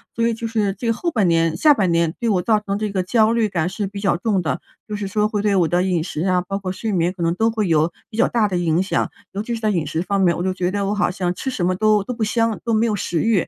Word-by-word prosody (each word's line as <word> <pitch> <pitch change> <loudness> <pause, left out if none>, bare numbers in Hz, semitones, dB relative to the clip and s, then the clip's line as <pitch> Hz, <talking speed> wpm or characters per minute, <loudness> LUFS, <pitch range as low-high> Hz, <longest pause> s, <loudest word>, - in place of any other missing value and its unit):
所 230 0 +1
以 230 - +1
就 230 +1 -6
是 215 -3 0
这 225 - -7
个 230 - +3
后 340 +9 -2
半 210 -8 +2
年 165 -1 +2
下 300 -2 +6
半 195 -9 +1
年 170 -1 +1
对 235 - 0
我 190 -4 +2
造 215 0 +3
成 200 -1 -3
这 210 -1 -2
个 190 -2 0
焦 215 +4 +3
虑 230 -2 +1
感 170 -3 -1
是 200 +1 -3
比 200 +1 -7
较 200 -3 +1
重 200 -1 0
的， 160 - -2 0.3
就 210 - -4
是 205 -1 -4
说 210 +2 +1
会 210 -1 -2
对 205 -1 +2
我 175 -3 +3
的 175 +3 +1
饮 180 -4 0
食 155 -3 -5
啊， 180 -1 +2
包 195 +3 -4
括 185 -2 -4
睡 220 +3 -3
眠 175 -2 +1
可 180 -3 -5
能 165 0 +2
都 225 +4 +1
会 215 -3 -1
有 160 0 +2 0.2
比 215 - -9
较 - - +4
大 225 -3 +1
的 185 - -3
影 170 +1 +1
响。 190 - -1 0.2
尤 200 - -3
其 235 +2 -3
是 - - -5
在 215 - +1
饮 170 -5 0
食 160 - -2
方 200 0 0
面， 175 -2 +3
我 175 - -2
就 185 0 0
觉 180 -1 -1
得 200 0 -1
我 205 - 0
好 205 - +1
像 180 -1 -2
吃 265 - -4
什 190 -9 -2
么 185 - +2
都 215 +1 +3
都 250 - -4
不 230 -2 -3
香， 225 0 0
都 230 - -2
没 220 +1 +3
有 215 -3 0
食 175 -3 -2
欲， 220 -6 +2
200 Hz, 345 characters per minute, -21 LUFS, 180-220 Hz, 0.3 s, 下